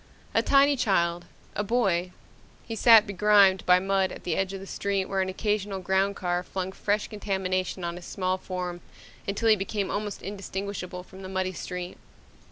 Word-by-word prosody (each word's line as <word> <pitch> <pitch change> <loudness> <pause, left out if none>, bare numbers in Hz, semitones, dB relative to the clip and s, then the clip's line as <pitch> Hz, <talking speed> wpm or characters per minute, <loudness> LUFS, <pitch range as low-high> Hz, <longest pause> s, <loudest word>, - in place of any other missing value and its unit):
A - - +4
tiny 280 +1 +5
child, 175 -8 +1 0.3
a 205 - 0
boy, 195 -6 +1 0.5
he 225 - -6
sat 225 -1 +7
begrimed 200 -1 +4
by 180 0 +7
mud 190 0 +1
at - - -9
the 170 - -1
edge 195 0 0
of 195 - -6
the 195 - -9
street 195 -1 -1
where 195 0 -1
an 190 - -1
occasional 205 0 -1
ground 190 +2 +1
car 175 -1 -1
flung 185 +1 -4
fresh 205 +2 -1
contamination 190 -3 -2
on 170 0 -3
his 175 - -10
small 185 0 -1
form 180 -2 -5 0.5
until 205 +3 0
he 215 - +7
became 200 0 -2
almost 205 0 -4
indistinguishable 195 -2 -5
from 190 +1 -13
the 190 - -7
muddy 190 0 -1
street. 180 +1 -6
190 Hz, 175 wpm, -27 LUFS, 185-205 Hz, 0.5 s, sat